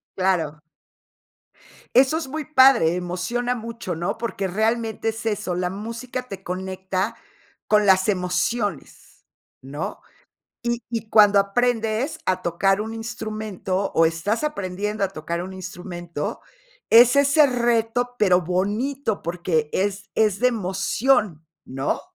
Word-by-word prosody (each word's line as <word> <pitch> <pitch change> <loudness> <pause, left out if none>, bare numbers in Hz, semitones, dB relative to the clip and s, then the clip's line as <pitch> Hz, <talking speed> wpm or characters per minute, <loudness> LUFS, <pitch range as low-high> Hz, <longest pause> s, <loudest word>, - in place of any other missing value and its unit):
Claro. 170 -6 0 1.3
Eso 265 +5 +5
es 325 - -6
muy 305 +3 -4
padre, 260 - +5
emociona 185 +8 -2
mucho, 230 -5 -5
¿no? 170 +4 -3
Porque 200 -4 -3
realmente 220 +3 -1
es 225 0 -4
eso, 210 -4 -1
la 180 0 -1
música 230 +6 -5
te 195 -3 -8
conecta 190 +2 -3 0.5
con 210 -1 +3
las 190 0 +4
emociones, 195 +3 -2 0.4
¿no? 145 +4 -6 0.6
Y 235 0 -1
y 225 -2 -4
cuando 205 -2 +6
aprendes 230 +6 0
a 185 0 0
tocar 195 +4 +1
un 220 +1 -4
instrumento, 215 -4 -4
o, 165 - +5
estás 165 - -1
aprendiendo 205 -5 -2
a - - 0
tocar 170 -1 -4
un 190 +1 -7
instrumento, 175 -3 -6 0.5
es 240 +2 +8
ese 280 +2 +5
reto, 240 -1 0
pero 185 -4 +4
bonito, 210 - -1
porque 170 -3 -1
es 195 +1 -2
es 210 -3 +2
de 250 - +5
emoción, 205 - 0 0.2
¿no? 135 +1 -2
205 Hz, 125 wpm, -23 LUFS, 185-235 Hz, 1.3 s, es